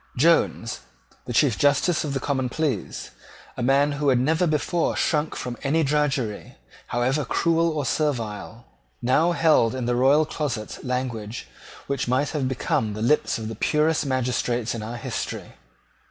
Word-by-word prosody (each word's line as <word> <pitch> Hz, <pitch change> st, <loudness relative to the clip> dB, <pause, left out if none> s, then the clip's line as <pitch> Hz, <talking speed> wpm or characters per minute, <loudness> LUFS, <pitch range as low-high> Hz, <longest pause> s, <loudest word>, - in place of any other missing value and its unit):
Jones, 140 Hz, -6 st, +2 dB, 0.5 s
the 120 Hz, -, -5 dB
Chief 125 Hz, -1 st, +3 dB
Justice 145 Hz, +4 st, +3 dB
of 145 Hz, -3 st, -3 dB
the -, -, 0 dB
Common 130 Hz, -2 st, -1 dB
Pleas, 140 Hz, -, -3 dB, 0.4 s
a -, -, -5 dB
man 140 Hz, +4 st, +3 dB
who 145 Hz, 0 st, 0 dB
had 130 Hz, -, +4 dB
never 160 Hz, +8 st, +2 dB
before 160 Hz, +2 st, 0 dB
shrunk 150 Hz, -1 st, 0 dB
from 125 Hz, -1 st, -5 dB
any 155 Hz, +4 st, +1 dB
drudgery, 135 Hz, -7 st, -1 dB, 0.3 s
however 130 Hz, +5 st, 0 dB
cruel 165 Hz, +5 st, +2 dB
or 150 Hz, -3 st, -2 dB
servile, 120 Hz, -6 st, -2 dB, 0.4 s
now 155 Hz, +8 st, +3 dB
held 155 Hz, -8 st, +3 dB
in 130 Hz, -2 st, -3 dB
the 120 Hz, 0 st, +1 dB
royal 140 Hz, +5 st, +4 dB
closet 140 Hz, -9 st, -4 dB
language 125 Hz, -4 st, -3 dB, 0.4 s
which 140 Hz, -2 st, -2 dB
might 130 Hz, +4 st, +1 dB
have 145 Hz, -4 st, -1 dB
become 115 Hz, -4 st, -1 dB
the 105 Hz, +1 st, -4 dB
lips 150 Hz, +6 st, +2 dB
of 110 Hz, -1 st, -5 dB
the 115 Hz, -, -4 dB
purest 150 Hz, +8 st, +1 dB
magistrates 125 Hz, -2 st, 0 dB
in 115 Hz, -, -5 dB
our 115 Hz, +3 st, -5 dB
history. -, -, -5 dB
135 Hz, 155 wpm, -24 LUFS, 120-150 Hz, 0.5 s, had